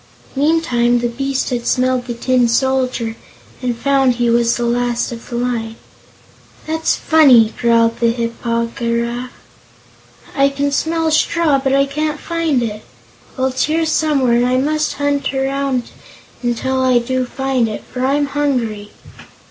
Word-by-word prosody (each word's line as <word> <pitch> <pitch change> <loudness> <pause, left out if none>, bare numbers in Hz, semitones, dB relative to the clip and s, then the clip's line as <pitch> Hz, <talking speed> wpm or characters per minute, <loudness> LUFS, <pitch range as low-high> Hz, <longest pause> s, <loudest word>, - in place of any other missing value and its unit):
Meantime, 270 -5 +2
the 240 0 0
beast 270 +3 -2
had 240 -1 -3
smelled 255 -1 +1
the 240 - -4
Tin 250 0 +2
Soldier 255 -2 0 0.5
and 245 -2 -2
found 270 0 +2
he 240 -1 0
was 235 0 +2
the 240 - -1
last 240 0 -1
of 230 -1 -9
the 240 - -5
line. 235 -2 -2 0.9
"That's 320 +1 0
funny!" 260 -9 +5
growled 230 -1 +3
the 235 - +3
Hip 230 0 -2
po 230 -1 -1
gy 235 0 -1
raf; 240 +2 -5 1.1
"I 275 -1 +4
can 280 +1 -1
smell 320 +2 0
straw, 310 -2 +2
but 270 0 +2
I 275 0 +3
can't 300 +2 -3
find 330 -7 -1
it. 215 -1 -5 0.5
Well, 260 0 +1
it's 260 0 0
here, 320 +2 0
somewhere, 295 -6 +1
and 240 +1 +3
I 255 +1 +1
must 305 +3 0
hunt 285 -1 -1
around 270 -1 -1 0.5
until 260 +2 -1
I 255 -1 +3
do 255 +1 -1
find 265 -3 -1
it, 210 - -6
for 250 0 -6
I'm 285 +2 +2
hungry." 250 -8 -2
255 Hz, 155 wpm, -17 LUFS, 235-280 Hz, 1.1 s, funny